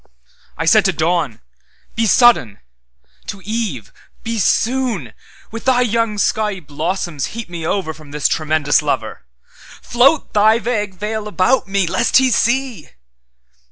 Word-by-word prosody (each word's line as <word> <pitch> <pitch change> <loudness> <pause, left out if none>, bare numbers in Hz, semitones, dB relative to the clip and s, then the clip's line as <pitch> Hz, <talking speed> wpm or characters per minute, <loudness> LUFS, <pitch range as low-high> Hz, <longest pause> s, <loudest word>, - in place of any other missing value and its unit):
I 165 - -2
said 215 +5 +5
to 190 - +2
Dawn: 160 -7 -1 0.5
Be 225 0 +1
sudden—to 85 - 0
Eve: 210 - -4 0.3
Be 230 0 -3
soon; 225 - 0 0.4
With 225 0 -8
thy 255 -1 +3
young 230 -2 0
skiey 210 -1 0
blossoms 160 0 -3
heap 230 -5 -6
me 170 -1 -7
overFrom 160 -6 -4
this 150 -1 0
tremendous 155 -2 +1
Lover—Float 240 - -2
thy 215 +2 +4
vague 210 -5 -3
veil 210 +2 -4
about 210 +5 +1
me, 195 -1 0
lest 235 +8 +2
He 260 -1 +3
see! 240 - 0
200 Hz, 125 wpm, -18 LUFS, 155-230 Hz, 0.5 s, said